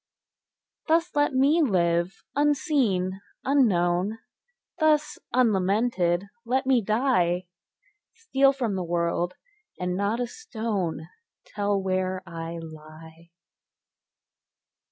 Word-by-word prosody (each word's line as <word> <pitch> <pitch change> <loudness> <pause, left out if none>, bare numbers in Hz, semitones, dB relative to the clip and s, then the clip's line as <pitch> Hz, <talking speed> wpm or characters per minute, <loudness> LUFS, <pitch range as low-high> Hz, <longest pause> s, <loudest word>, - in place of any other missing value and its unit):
Thus 335 +1 +2
let 290 0 +3
me 285 +6 +4
live, 175 - +1
unseen, 270 - +1 0.2
unknown; 200 -7 +2 0.6
Thus 305 -1 +2
unlamented 200 -5 +2 0.2
let 260 +3 0
me 260 -3 +3
die; 195 -6 +1 0.7
Steal 275 -12 +3
from 250 -6 -2
the 185 -1 -2
world, 170 +1 -1 0.4
and 180 0 -1
not 200 +4 0
a 245 - 0
stone 220 - -4 0.4
Tell 205 -1 -1
where 185 0 -1
I 165 -1 -6
lie. 160 +1 -12
200 Hz, 95 wpm, -26 LUFS, 175-265 Hz, 0.7 s, me